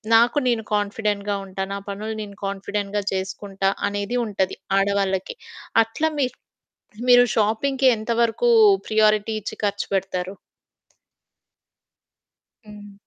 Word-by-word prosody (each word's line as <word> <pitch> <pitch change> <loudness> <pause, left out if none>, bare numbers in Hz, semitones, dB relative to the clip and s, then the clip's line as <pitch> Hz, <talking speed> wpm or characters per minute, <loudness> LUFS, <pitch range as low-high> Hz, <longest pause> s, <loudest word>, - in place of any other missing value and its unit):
నాకు 235 +5 +4
నేను 230 -2 0
కాన్ఫిడెంట్‌‌గా 205 0 -1
ఉంటా, 190 0 -6
నా - - -3
పనులు 210 +2 -4
నేను 200 -1 -10
కాన్ఫిడెంట్‌‌గా 200 +1 -3
చేసుకుంటా 195 +1 -2 0.2
అనేది 205 +4 -2
ఉంటది 195 -3 -1 0.2
ఆడవాళ్ళకి. 195 -1 0 0.5
అట్లా 225 +8 -2
మీ 275 - +3 0.8
మీరు 245 0 +8
షాపింగ్‌కి 260 +6 +2
ఎంత 220 +2 -4
వరకు 235 - +1 0.4
ప్రియారిటీ 215 0 +3
ఇచ్చి 205 - -6
ఖర్చు 205 0 -1
పెడతారు? 190 -1 -2 2.3
హ్మ్. 205 -1 -12
205 Hz, 105 wpm, -23 LUFS, 195-220 Hz, 2.3 s, మీరు